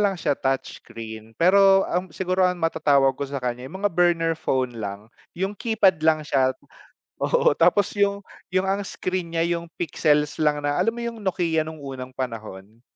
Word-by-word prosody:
lang 200 -2 +2
siya 150 - 0
touch 135 -1 -2
screen, 110 -1 -10
pero 195 +2 +5
ang 180 +2 -2
siguro 185 +2 -2
ang 180 0 +2
matatawag 145 -5 +2
ko 140 - -3
sa 140 - -4
kanya 125 +1 -4
yung 190 +6 -8
mga 205 - +2
burner 170 -1 +2
phone 130 -5 -1
lang, 100 +2 -7 0.2
yung 190 +3 -1
keypad 200 -7 +2
lang 155 -1 +2
siya 130 -3 +2 0.7
oo - - +3
tapos 205 0 +3
yung 200 0 +2 0.3
yung 185 +1 +1
ang 195 +1 0
screen 185 -3 -4
nya 165 - +2
yung 170 -1 -3
pixels 150 -2 +1
lang 150 -1 +2
na 145 - +1
alam 225 - +2
mo 235 - -10
yung 230 -2 -5
Nokia 170 -4 0
nung 160 0 -8
unang 130 -2 -7
panahon? 115 -4 -7
165 Hz, 180 wpm, -24 LUFS, 135-190 Hz, 0.7 s, pero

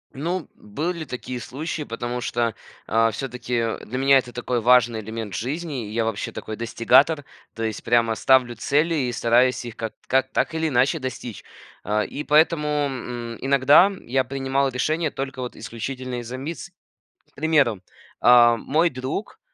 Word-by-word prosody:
Ну, 170 +4 -3
были 180 -8 -4
такие 125 -1 -6
случаи, 150 +6 -5
потому 120 -1 -4
что, 120 -2 -1 0.3
а, 115 +1 +3
всё-таки 120 -1 -3
для 125 - -5
меня 135 +1 +5
это 125 -1 -7
такой 125 0 -2
важный 120 -1 +4
элемент 110 -1 -6
в 80 - -2
жизни. 135 -4 -4
Я 115 +1 0
вообще 110 -2 -3
такой 110 - -6
достигатор, 130 +6 +3 0.3
то 115 - -4
есть 110 -1 -3
прямо 115 -1 +2
ставлю 125 -2 +3
цели 150 +8 +1
и - - -2
стараюсь 120 +2 +2
их 120 - -7
ка 115 -1 -4 0.2
как 130 0 +2
так 160 - 0
или 160 0 0
иначе 135 +4 +2
достичь. 125 -4 -6 0.4
А, 105 +1 0
и 150 - -6
поэтому, 150 0 +3 0.2
м, 120 -3 -5
иногда 140 +8 +5
я 130 +2 +1
принимал 135 +1 -1
решения 155 +5 0
только, 135 -1 -5
вот, 125 - -5
исключительно 125 +3 -5
из-за 120 +1 -6
амбиций. 165 +6 -7 0.6
К - - -34
примеру, 145 - +2 0.4
а, 120 -1 +7
мой 155 +8 +1
друг, 130 +11 -5
125 Hz, 160 wpm, -23 LUFS, 115-145 Hz, 0.6 s, а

